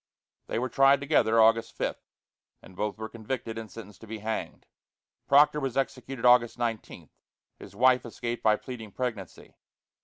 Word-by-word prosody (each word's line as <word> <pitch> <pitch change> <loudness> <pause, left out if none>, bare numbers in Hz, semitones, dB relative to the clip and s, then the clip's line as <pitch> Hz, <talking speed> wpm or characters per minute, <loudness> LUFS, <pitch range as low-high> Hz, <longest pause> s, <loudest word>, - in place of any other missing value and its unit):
They - - -3
were 125 +2 -1
tried 135 +1 +4
together 140 -6 +2
August 115 +1 +3
5, - - -2 0.7
and 95 - -15
both 105 +3 -3
were 110 0 -5
convicted 115 0 -5
and 110 -1 -9
sentenced 105 -2 -12
to 110 - -12
be 110 +1 -6
hanged. 110 +1 -5 0.6
Proctor 145 +2 +5
was 135 -3 -3
executed 135 -2 -3
August 120 -1 +5
19. 115 -2 -5 0.5
His - - -12
wife 130 +1 +4
escaped 120 0 -5
by 110 -1 +4
pleading 110 -3 -9
pregnancy. 115 -8 -6
115 Hz, 155 wpm, -27 LUFS, 110-130 Hz, 0.7 s, Proctor